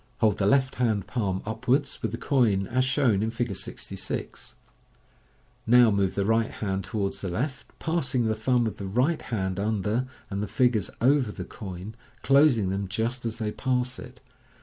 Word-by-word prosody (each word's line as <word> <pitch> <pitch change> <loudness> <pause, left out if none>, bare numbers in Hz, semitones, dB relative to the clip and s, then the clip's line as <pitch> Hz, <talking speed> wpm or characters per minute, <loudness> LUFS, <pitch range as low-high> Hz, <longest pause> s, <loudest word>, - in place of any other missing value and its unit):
Hold 105 -3 +2
the 100 - +2
left 130 +2 +3
hand 110 -5 +1
palm 95 -6 -2
upwards, 125 +6 0
with 110 - -2
the 115 - -4
coin 115 -7 +2
as 130 +6 +1
shown 130 -6 +2
in 110 - 0
Fig 115 -3 -2
66. - - -5 1.1
Now 120 -1 +7
move 100 -2 +1
the 100 - 0
right 115 +1 +2
hand 95 -3 -3
to 110 - -5
wards 100 -2 -1
the 95 - -3
left, 130 - -3
p 160 - -4
assing 135 -7 +1
the 110 - +2
thumb 120 +2 +1
of 110 - -3
the 100 - -5
right 130 - +1
hand 95 -5 -2
under, 110 +4 0 0.2
and 100 +1 -2
the 105 - -2
fingers 110 0 +2
over 130 -2 +3
the 90 -3 -7
coin, 95 +1 -8 0.3
closing 135 -8 +4
them 100 0 -2
just 115 +5 -2
as 115 0 -4
they 110 -2 -2
pass 125 +1 -1
it. - - -11
110 Hz, 185 wpm, -27 LUFS, 100-125 Hz, 1.1 s, Now